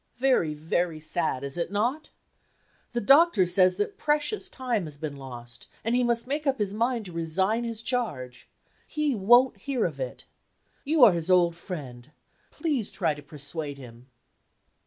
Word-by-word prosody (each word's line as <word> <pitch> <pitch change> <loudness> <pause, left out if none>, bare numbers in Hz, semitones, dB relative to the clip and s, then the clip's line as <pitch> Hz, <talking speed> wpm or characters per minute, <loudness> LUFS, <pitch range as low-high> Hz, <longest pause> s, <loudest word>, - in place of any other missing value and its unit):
Very, 245 -12 +2
very 160 +1 -1
sad, 155 -4 -1
is 140 +3 -5
it 170 - -2
not? 245 +9 -1 0.8
The 240 - -2
doctor 275 - +5
says 185 +1 +3
that 415 -1 -3
precious 300 +7 0
time 245 - -2
has 150 -2 -9
been 150 -1 -5
lost, 120 -3 -10 0.2
and 230 - 0
he 250 0 +3
must 235 -1 +1
make 290 +3 -3
up 270 0 +2
his 205 -3 -1
mind 230 +1 -1
to 180 - -9
resign 190 +8 0
his 230 -1 -5
charge. 150 - -3 0.4
He 300 -2 -1
won't 240 +5 +4
hear 275 -4 -1
of - - -4
it. - - -6 0.6
You 300 -1 +3
are 230 - +9
his 170 +1 -2
old 175 -2 +4
friend. 140 -8 -8 0.4
Please 290 - -1
try 165 -4 0
to 145 - -10
persuade 145 0 -4
him." 125 -2 -13
195 Hz, 165 wpm, -26 LUFS, 155-250 Hz, 0.8 s, are